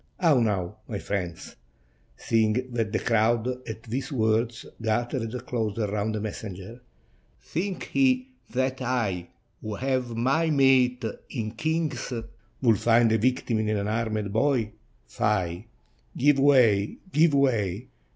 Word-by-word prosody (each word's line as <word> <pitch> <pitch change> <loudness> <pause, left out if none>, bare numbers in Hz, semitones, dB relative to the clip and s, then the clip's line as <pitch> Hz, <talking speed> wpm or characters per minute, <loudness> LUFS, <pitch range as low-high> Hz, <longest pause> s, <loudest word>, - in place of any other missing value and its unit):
How 160 -7 +4
now, 105 -3 -1
my 105 - -4
friends?" 95 -4 -4 0.6
seeing 110 -1 +2 0.2
that 115 -3 -1
the 110 - +1
crowd 115 +1 +2 0.2
at 110 0 -7
these 130 +7 -4
words 115 -1 0 0.2
gathered 120 +2 -2
closer 110 -3 -1
round 105 +1 -1
the - - -2
messenger. 105 +1 -7 0.3
" 60 +1 -37
Think 185 +3 -3
ye 260 -1 +3 0.2
that 130 +1 -1
I, 110 -9 -1 0.3
who 110 -1 -4
have 130 -1 -1
my 140 +8 +2
mate 130 -4 +4 0.2
in 110 -4 -3
kings, 160 +5 -2 0.5
would 115 -5 +4
find 115 -1 +4
a 110 - +3
victim 120 -1 +1
in 110 -1 0
an 110 - +1
unarmed 105 0 -2
boy? 115 -2 +1 0.3
Fie! 95 -1 -1 0.5
give 145 +1 +4
way, 120 -8 +4
give 155 -2 +4
way. 115 -6 +1
115 Hz, 130 wpm, -26 LUFS, 105-130 Hz, 0.6 s, How